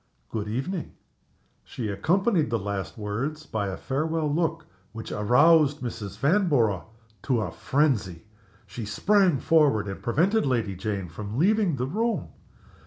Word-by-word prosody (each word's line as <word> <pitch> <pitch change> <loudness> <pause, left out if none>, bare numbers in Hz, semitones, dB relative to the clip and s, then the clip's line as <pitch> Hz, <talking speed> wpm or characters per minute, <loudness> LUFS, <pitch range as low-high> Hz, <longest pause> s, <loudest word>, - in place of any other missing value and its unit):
Good 105 -2 -3
evening!" 145 - -3 0.7
She 115 - -5
accompanied 175 - +1
the 115 - +1
last 100 -1 -4
words 125 +9 -4
by 105 -7 -2
a 95 - -4
farewell 155 +2 -1
look 165 0 -1 0.3
which 115 0 -7
aroused 145 +7 +4
Mrs. 105 -5 -6
Vanborough 140 - +2 0.4
to 115 -3 0
frenzy. 120 - 0 0.4
She 110 +4 -7
sprang 180 - +2
forward 135 -7 +3
and 95 - -6
prevented 185 - +2
Lady 115 -7 0
Jane 100 -1 -3
from 105 +7 -7
leaving 195 0 +3
the 125 -1 -2
room. 225 - -1
130 Hz, 130 wpm, -26 LUFS, 105-160 Hz, 0.7 s, aroused